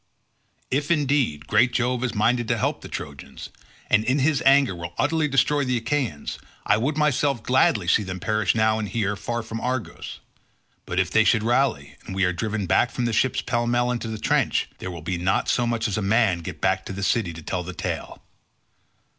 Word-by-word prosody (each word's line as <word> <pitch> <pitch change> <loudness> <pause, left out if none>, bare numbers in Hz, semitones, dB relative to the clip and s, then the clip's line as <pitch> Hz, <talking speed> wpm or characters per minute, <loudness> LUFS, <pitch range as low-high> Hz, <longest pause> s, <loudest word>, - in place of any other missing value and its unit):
If, 145 +4 0
indeed, 140 - +1
great 120 +6 +3
Jove 125 0 0
is 125 -3 -2
minded 115 +3 +1
to - - +1
help - - -1
the - - -9
Trojans, 70 -2 -8 0.4
and 110 - +3
in 130 +4 +1
his 145 +1 +2
anger 135 -5 +5
will 85 0 -7
utterly 155 +1 +1
destroy 145 +1 +2
the 125 -2 0
Achaeans, 120 - -2 0.3
I 105 - +3
would 140 +7 -1
myself 145 -5 +1
gladly 115 -7 +2
see 100 - +4
them 95 -2 -5
perish 105 0 0
now 110 0 +2
and 105 -2 -3
here 105 0 -1
far 120 +3 -4
from 115 0 -6
Argos; 125 -2 -4 0.7
but 85 - -1
if 95 -1 0
they 110 - +5
should 110 0 +3
rally 120 - 0
and 95 - -6
we 95 - +1
are 90 - +1
driven 105 +3 -2
back 120 +7 +3
from 120 +1 -3
the 115 - -1
ships 130 +4 +1
pell 120 -1 -1
mell 120 +1 +1
into 120 -2 -3
the 110 -1 -4
trench - - +1
there 95 - -5
will 85 -3 -8
be 90 +1 -2
not 95 +2 0
so 120 -1 +1
much 115 -1 0
as 105 -1 -2
a - - -3
man 100 -3 +2
get 85 - -7
back - - +1
to - - -5
the 100 +1 -5
city 100 -2 +1
to 80 0 -10
tell 90 +2 -2
the 90 +1 -6
tale. - - -5
115 Hz, 215 wpm, -24 LUFS, 95-125 Hz, 0.7 s, anger